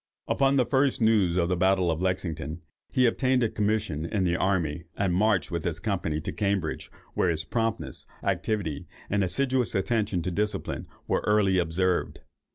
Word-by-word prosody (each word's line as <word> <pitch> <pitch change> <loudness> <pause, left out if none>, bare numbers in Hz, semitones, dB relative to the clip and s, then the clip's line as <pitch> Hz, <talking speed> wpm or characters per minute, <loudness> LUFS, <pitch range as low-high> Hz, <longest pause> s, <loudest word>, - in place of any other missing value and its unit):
Upon 135 0 +2
the 130 -3 +3
first 135 +1 +2
news 105 -6 +3
of 85 -2 +2
the 90 - +1
battle 95 -1 +3
of 80 +1 -2
Lexington, 85 -4 -2 0.3
he 130 - +3
obtained 130 +1 +2
a 115 - +2
commission 105 -8 -1
in 95 +4 -1
the 90 -1 +2
army, 85 -4 0
and 95 -3 +1
marched 100 0 +2
with 85 -2 -2
his 85 -2 -2
company 90 -7 -1
to - - -4
Cambridge, 100 -6 -1 0.2
where 90 - +2
his 80 -1 0
promptness, 110 - -2 0.2
activity, 85 -10 -1 0.2
and 100 -1 +2
assiduous 130 +5 +1
attention 100 -3 0
to 90 - -2
discipline, 105 +4 -2 0.2
were - - 0
early 100 -3 +3
observed. 90 +1 0
95 Hz, 165 wpm, -27 LUFS, 85-110 Hz, 0.3 s, the